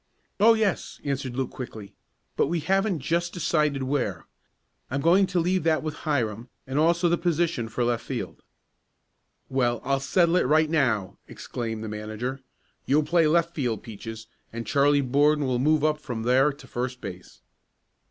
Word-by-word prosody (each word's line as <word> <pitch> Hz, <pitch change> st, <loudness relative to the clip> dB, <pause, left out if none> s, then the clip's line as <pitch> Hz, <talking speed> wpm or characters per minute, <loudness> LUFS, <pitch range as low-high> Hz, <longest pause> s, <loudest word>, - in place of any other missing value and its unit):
"Oh, 225 Hz, +3 st, +6 dB
yes," 215 Hz, -4 st, -1 dB
answered 135 Hz, -3 st, -3 dB
Luke 130 Hz, -1 st, -2 dB
quickly. 110 Hz, -5 st, -8 dB, 0.4 s
"But -, -, +2 dB
we 170 Hz, +1 st, -1 dB
haven't 195 Hz, 0 st, +1 dB
just 170 Hz, +5 st, -1 dB
decided 150 Hz, -5 st, 0 dB
where. 130 Hz, -, -2 dB, 0.6 s
I'm 140 Hz, -, -1 dB
going 180 Hz, +6 st, +4 dB
to 180 Hz, -1 st, 0 dB
leave 180 Hz, +2 st, +1 dB
that 160 Hz, -2 st, +2 dB
with 155 Hz, -1 st, -3 dB, 0.2 s
Hiram, 120 Hz, -4 st, -1 dB, 0.2 s
and 130 Hz, +2 st, -1 dB
also 170 Hz, +2 st, +3 dB
the 170 Hz, 0 st, +1 dB
position 170 Hz, -8 st, 0 dB
for 120 Hz, +2 st, -1 dB
left 120 Hz, -1 st, 0 dB
field." -, -, -5 dB, 1.1 s
"Well, 120 Hz, -3 st, 0 dB
I'll 135 Hz, +1 st, +1 dB
settle 170 Hz, +5 st, +2 dB
it 180 Hz, -, +2 dB
right 155 Hz, +2 st, +3 dB
now!" 120 Hz, -, 0 dB
exclaimed 115 Hz, -2 st, -5 dB
the -, -, -4 dB
manager. 110 Hz, +5 st, -4 dB, 0.5 s
"You'll 150 Hz, +3 st, +3 dB
play 165 Hz, +1 st, +3 dB
left 170 Hz, +2 st, +2 dB
field, 125 Hz, -9 st, -2 dB
Peaches, 110 Hz, 0 st, -8 dB, 0.3 s
and 115 Hz, 0 st, -5 dB
Charlie 145 Hz, +4 st, +3 dB
Borden 145 Hz, +3 st, +2 dB
will 125 Hz, -2 st, 0 dB
move 150 Hz, +2 st, +2 dB
up 155 Hz, -1 st, +2 dB
from 125 Hz, -6 st, -5 dB
there 130 Hz, +4 st, +4 dB
to 140 Hz, -1 st, -14 dB
first 125 Hz, 0 st, -4 dB
base." 90 Hz, -5 st, -9 dB
140 Hz, 165 wpm, -26 LUFS, 120-165 Hz, 1.1 s, Oh